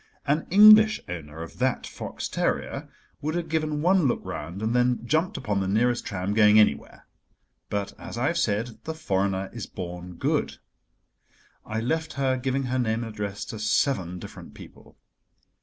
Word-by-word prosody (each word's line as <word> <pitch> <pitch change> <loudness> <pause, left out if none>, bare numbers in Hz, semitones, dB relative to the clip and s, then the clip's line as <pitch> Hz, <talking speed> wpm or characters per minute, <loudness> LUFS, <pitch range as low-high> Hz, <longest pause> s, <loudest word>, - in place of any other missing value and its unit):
An 150 +3 0
English 215 +3 +8
owner 80 -2 -7
of 85 - -12
that 130 0 0
fox - - -6
terrier - - -2 0.3
would 155 +3 -2
have 175 -1 -2
given 155 -2 -1
one 180 -3 +4
look 120 - 0
round 85 +7 -6
and 115 +2 0
then 125 0 +3
have - - -12
jumped 160 - 0
upon 105 -5 -1
the 95 - -1
nearest 120 +5 +1
tram 95 -1 -2
going 105 0 +6
anywhere. 70 -10 +1 0.6
But, 100 -1 -3
as - - -8
I 120 - 0
have 170 +3 +1
said, 115 -1 -1
the 160 - -4
foreigner 95 -8 -1
is 115 -3 -6
born 90 -1 -7
good. - - -1 1.1
I 110 +1 -2
left 160 +5 -1
her 135 -2 +1
giving 130 +1 -1
her 130 0 -1
name 115 -1 0
and 115 -1 -7
address 100 -1 -4
to 110 - -7
seven 105 -4 0
different - - -11
people. - - -14
115 Hz, 175 wpm, -26 LUFS, 100-150 Hz, 1.1 s, English